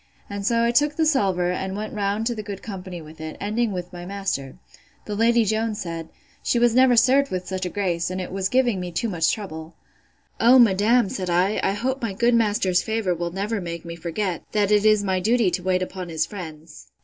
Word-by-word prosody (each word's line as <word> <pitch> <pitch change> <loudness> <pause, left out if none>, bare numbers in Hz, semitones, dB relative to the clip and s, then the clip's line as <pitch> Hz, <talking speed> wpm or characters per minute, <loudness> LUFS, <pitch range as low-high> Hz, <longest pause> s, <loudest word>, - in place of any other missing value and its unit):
And 200 0 -4
so 230 +3 +2
I 235 - +3
took 295 +4 +2
the 320 - +2
salver, 190 - +2
and 190 +2 -3
went 215 +1 -5
round 205 +1 -1
to 240 - 0
the 220 - -5
good 200 -2 -7
company 185 -5 -7
with 155 +1 -13
it, 155 0 -6
ending 215 +2 -1
with 180 -1 -5
my 175 0 -7
master. 185 -8 -4 0.5
The 210 - -4
Lady 230 +1 +3
Jones 220 +1 -1
said, 165 -2 -5 0.3
She - - 0
never 245 +2 +5
was 230 - +6
served 275 +3 +3
with 185 -1 -3
such 185 0 -3
a - - -4
grace, 175 -4 -1
and 185 0 -4
it 180 - -5
was 190 0 -1
giving 245 -6 +2
me 180 -1 -5
too 230 +7 -1
much 165 -4 +1
trouble. 160 -6 -6 0.6
O, 245 +3 +7
madam, 225 0 +4
said 185 -1 -4
I, 180 +4 +2
I 195 - +1
hope 260 +6 -2
my 225 -4 -2
good 235 +5 +2
master's 205 -5 +2
favour 220 -4 -1
will 170 0 -3
never 200 +4 -3
make 170 -1 -6
me 170 0 -6
forget, 170 +2 -3
that 210 -1 +2
it 210 0 +4
is 215 -1 +4
my 190 -2 0
duty 220 0 +2
to 180 - -2
wait 185 0 +1
upon 185 -1 -6
his 160 -1 0
friends. 160 -5 -10
200 Hz, 225 wpm, -23 LUFS, 180-225 Hz, 0.6 s, O